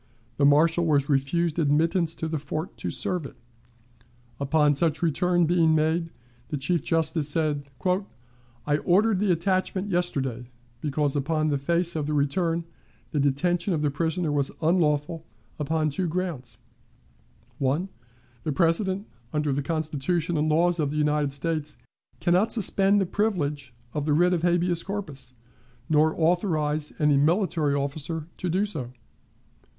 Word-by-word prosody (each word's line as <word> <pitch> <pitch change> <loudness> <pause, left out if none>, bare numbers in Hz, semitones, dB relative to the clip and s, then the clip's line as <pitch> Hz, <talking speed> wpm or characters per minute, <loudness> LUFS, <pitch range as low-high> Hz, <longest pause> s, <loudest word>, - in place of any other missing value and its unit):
The 140 - +3
marshal 160 +4 +4
was 145 -3 +2
refused 155 +4 +1
admittance 165 +3 +2
to 160 - -3
the 160 -1 -2
fort 155 +4 -5
to - - -3
serve 180 -3 -2
it. 135 - -9 1.0
Upon 145 +1 +3
such 155 +2 +1
return 175 +2 +2
being 165 -1 +3
made, 160 +2 +1 0.4
the 150 - -3
Chief 155 +3 0
Justice 160 -2 0
said: 150 -2 -1 1.0
"I 145 0 +2
ordered 195 +5 +2
the 205 -2 +2
attachment 185 +3 0
yesterday, 135 - -1 0.3
because 145 -1 0
upon 155 +2 0
the 140 -2 0
face 170 +4 0
of 150 -2 -2
the 150 - -1
return 165 +4 0 0.5
the 150 - 0
detention 170 +6 +1
of 150 - -2
the 145 - +1
prisoner 165 +2 -1
was 140 -2 +1
unlawful 160 -1 +1 0.4
upon 155 +1 0
two 175 +6 -1
grounds: 170 -7 -4 1.0
"1. 145 +7 0 0.6
The 155 - -1
President, 185 +5 +1 0.3
under 150 -2 0
the 140 - -1
Constitution 160 +2 -1
and 155 +1 +1
laws 170 +2 +2
of 150 -2 +1
the 150 - -4
United 150 -1 +1
States, 150 +1 -3 0.4
can 175 - +1
not 190 +5 +3
suspend 200 -2 +3
the 195 - +1
privilege 150 - -1 0.2
of 150 -2 -2
the 150 - +3
writ 175 +4 +3
of 170 - 0
habeas 175 0 +1
corpus, 155 -11 -5 0.5
nor 155 +1 +2
authorize 155 -3 +1
any 150 -2 +3
military 160 -1 +2
officer 145 +3 -3
to 180 - -3
do 190 +5 +1
so. 150 -12 -5
160 Hz, 145 wpm, -26 LUFS, 145-175 Hz, 1.0 s, marshal